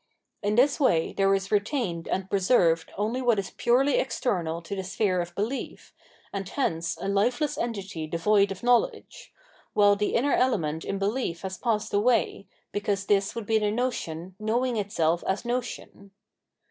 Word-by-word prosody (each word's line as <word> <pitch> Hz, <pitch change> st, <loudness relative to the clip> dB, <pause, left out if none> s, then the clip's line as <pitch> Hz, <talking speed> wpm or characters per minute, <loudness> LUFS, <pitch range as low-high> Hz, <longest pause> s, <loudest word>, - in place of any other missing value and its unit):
In 205 Hz, +1 st, 0 dB
this 275 Hz, +6 st, +4 dB
way 170 Hz, -, +2 dB
there 195 Hz, 0 st, +2 dB
is 190 Hz, 0 st, -4 dB
retained 205 Hz, -, -1 dB
and 190 Hz, 0 st, -2 dB
preserved 185 Hz, -5 st, +2 dB
only 220 Hz, +5 st, -1 dB
what 240 Hz, -3 st, +3 dB
is 195 Hz, -, -3 dB
purely 260 Hz, +3 st, +2 dB
external 180 Hz, -10 st, -1 dB
to 185 Hz, +5 st, -5 dB
the 190 Hz, -, -3 dB
sphere 185 Hz, -1 st, 0 dB
of 175 Hz, 0 st, -7 dB
belief, 225 Hz, +7 st, -4 dB, 0.4 s
and 195 Hz, -1 st, -4 dB
hence 165 Hz, -, -1 dB
a -, -, -4 dB
lifeless 245 Hz, +10 st, +1 dB
entity 195 Hz, -8 st, -4 dB
devoid 200 Hz, +5 st, +2 dB
of 195 Hz, +2 st, -7 dB
knowledge; 245 Hz, -, 0 dB, 0.4 s
while 205 Hz, -1 st, +5 dB
the 210 Hz, +1 st, -1 dB
inner 275 Hz, +5 st, +2 dB
element 165 Hz, -11 st, +1 dB
in 195 Hz, -, -3 dB
behef 200 Hz, -4 st, -1 dB
has 190 Hz, -1 st, -5 dB
passed 220 Hz, -2 st, -1 dB
away, 210 Hz, -1 st, +1 dB, 0.2 s
because 205 Hz, -1 st, -1 dB
this 200 Hz, -1 st, +1 dB
would 230 Hz, -2 st, -4 dB
be 220 Hz, +1 st, +2 dB
the 210 Hz, -1 st, +1 dB
notion 190 Hz, -7 st, -3 dB
knowing 235 Hz, +3 st, 0 dB
itself 175 Hz, -5 st, 0 dB
as 190 Hz, +5 st, -1 dB
notion. 240 Hz, -4 st, -4 dB
205 Hz, 160 wpm, -27 LUFS, 190-240 Hz, 0.4 s, while